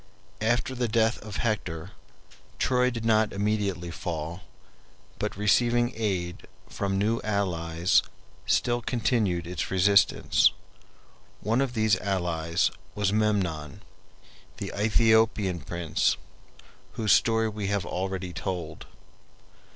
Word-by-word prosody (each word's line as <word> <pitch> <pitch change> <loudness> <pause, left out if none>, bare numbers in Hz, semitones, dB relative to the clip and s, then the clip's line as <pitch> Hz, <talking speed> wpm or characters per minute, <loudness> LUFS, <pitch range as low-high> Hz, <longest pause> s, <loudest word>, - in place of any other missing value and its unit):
After 120 +3 +1
the 125 -1 -1
death 115 +1 +2
of 105 -2 -8
Hector, 95 -6 -2 0.7
Troy 125 0 +2
did 115 -2 -5
not 110 -1 +3
immediately 100 -4 -1
fall, 85 0 -5 0.8
but - - -3
receiving 120 +3 +2
aid 95 -6 -3 0.2
from 100 -1 -2
new 110 +3 +1
allies 90 -5 +1 0.5
still 120 0 +2
continued 110 -8 0
its 90 -1 -4
resistance. 100 +2 +4 0.9
One 115 +5 +1
of 130 -3 -2
these 110 -3 +3
allies 85 -4 0 0.2
was 100 -1 0
Memnon, 95 -9 -1 0.7
the - - -5
Aethiopian 110 -3 +2
prince, 85 -3 0 0.8
whose 110 -2 0
story 115 -1 +4
we 105 -2 -4
have 100 -3 -1
already 95 -1 -3
told. 85 -5 -5
100 Hz, 105 wpm, -27 LUFS, 90-110 Hz, 0.9 s, resistance